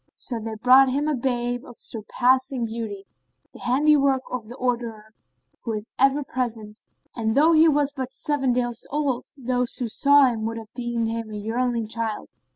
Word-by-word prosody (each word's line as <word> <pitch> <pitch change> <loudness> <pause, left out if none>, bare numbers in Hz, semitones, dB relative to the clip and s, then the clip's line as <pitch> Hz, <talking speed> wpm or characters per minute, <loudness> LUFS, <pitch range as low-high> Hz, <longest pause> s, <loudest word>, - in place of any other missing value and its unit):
So 240 -3 -5
they 220 0 -5
brought 255 +4 +6
him 285 +3 0
a 305 - +1
babe 245 -2 -1
of 245 - -13
surpassing 255 +3 0
beauty, 220 -3 -5 0.5
the - - -13
handiwork 275 0 +3
of 245 -4 -4
the 240 - -9
Orderer 235 -4 -3 0.5
who 230 - -3
is 210 +1 -6
ever 275 +2 +3
present 225 -5 -4 0.3
and, 220 -1 -1
though 310 +4 +5
he 320 0 +6
was 290 -1 +1
but 260 -1 -5
seven 275 -2 0
days 240 -1 -2
old, 280 -4 -1
those 250 -1 -1
who 245 - -2
saw 285 +5 +5
him 230 -4 -1
would 230 +1 -3
have 220 -2 -10
deemed 240 -2 -2
him 225 -1 -4
a 210 - -6
yearling 230 +2 -1
child. 225 -1 -4
245 Hz, 175 wpm, -24 LUFS, 225-265 Hz, 0.5 s, brought